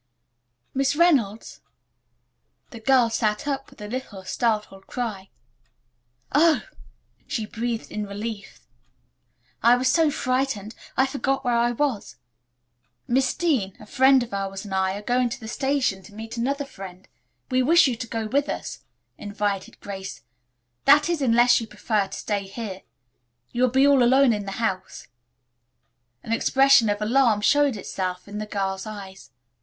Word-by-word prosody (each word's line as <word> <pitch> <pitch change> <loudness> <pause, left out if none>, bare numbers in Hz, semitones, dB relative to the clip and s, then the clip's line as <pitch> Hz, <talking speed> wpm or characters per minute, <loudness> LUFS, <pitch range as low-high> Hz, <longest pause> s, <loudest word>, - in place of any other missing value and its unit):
"Miss 270 +1 +1
Reynolds." 270 - +1 1.1
The 230 - -9
girl 240 0 +3
sat 215 +3 -1
up 275 -1 -3
with - - -19
a 210 - -6
little, 210 -5 -6
startled 210 -2 -2
cry. 215 -6 -4 1.0
"Oh," 315 +2 +4 0.6
she 225 -5 -2
breathed, 230 +1 -4
in 210 -1 -4
relief. 205 +1 -7 1.0
"I 235 +1 +6
was 255 +1 +1
so 320 +4 +4
frightened. 255 -6 -1 0.2
I 265 - +5
forgot 270 0 -2
where 245 - +2
I 235 +1 +2
was." 255 -5 -2 0.9
"Miss 260 +1 +2
Dean, 255 - 0
a - - -12
friend 265 +3 +4
of 235 - -10
ours 195 0 -4
and 200 - -7
I 190 0 +1
are 205 - -7
going 245 +2 +1
to 265 +3 -6
the 220 - -9
station 265 -5 0
to 205 +2 -15
meet 225 +2 -7
another 275 +4 -1
friend. 190 -6 -11 0.4
We 255 0 +3
wish 330 +7 +5
you 255 -4 +1
to 235 - -5
go 225 -1 -3
with 280 +6 0
us," - - -5 0.4
invited 205 -2 -3
Grace. 190 - -7 0.6
"That 295 +3 +6
is, 340 -4 -1
unless 240 -1 +4
you 225 - -6
prefer 210 -3 -1
to - - -8
stay 200 -2 -3
here. 195 -2 -6 0.7
You 240 - -2
will 255 - +4
be 265 +3 +4
all 280 -2 +5
alone 260 +1 +5
in 205 -2 -4
the 195 - -4
house." 190 -4 -3 1.2
An - - -7
expression 270 -1 +4
of 205 +1 -1
alarm 230 -2 +3
showed 285 +3 +3
itself 185 -1 -4
in 205 +1 -6
the 215 - -5
girl's 195 -1 -3
eyes. 195 -2 -9
230 Hz, 155 wpm, -24 LUFS, 205-265 Hz, 1.2 s, I